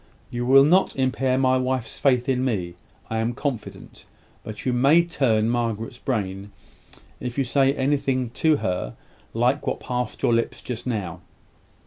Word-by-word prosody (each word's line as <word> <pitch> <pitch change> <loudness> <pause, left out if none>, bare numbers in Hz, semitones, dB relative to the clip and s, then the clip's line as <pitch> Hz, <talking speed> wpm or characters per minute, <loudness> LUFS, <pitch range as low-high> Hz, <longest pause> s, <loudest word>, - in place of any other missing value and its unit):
You 120 0 -3
will 135 +1 +7
not 180 +6 +3
impair 130 0 +1
my 130 -1 +3
wife's 130 -3 -2
faith 125 -3 +2
in 130 -1 +1
me, 95 -9 -1 0.4
I 110 - 0
am 115 +2 0
confident; 125 -7 -6 0.4
but 110 -1 -8
you 125 - +1
may 140 +7 +5
turn 115 -10 +1
Margaret's 115 -1 -2
brain, 100 -5 -3 0.7
if 125 0 -5
you 135 - +2
say 135 +1 +2
to 140 - -6
her - - -7
anything 135 -3 0 1.0
like 125 +5 +1
what - - -1
passed 125 -2 -4
your 120 - +3
lips 115 0 -1
just 125 0 -6
now. 95 -7 -3
125 Hz, 155 wpm, -24 LUFS, 115-135 Hz, 1.0 s, will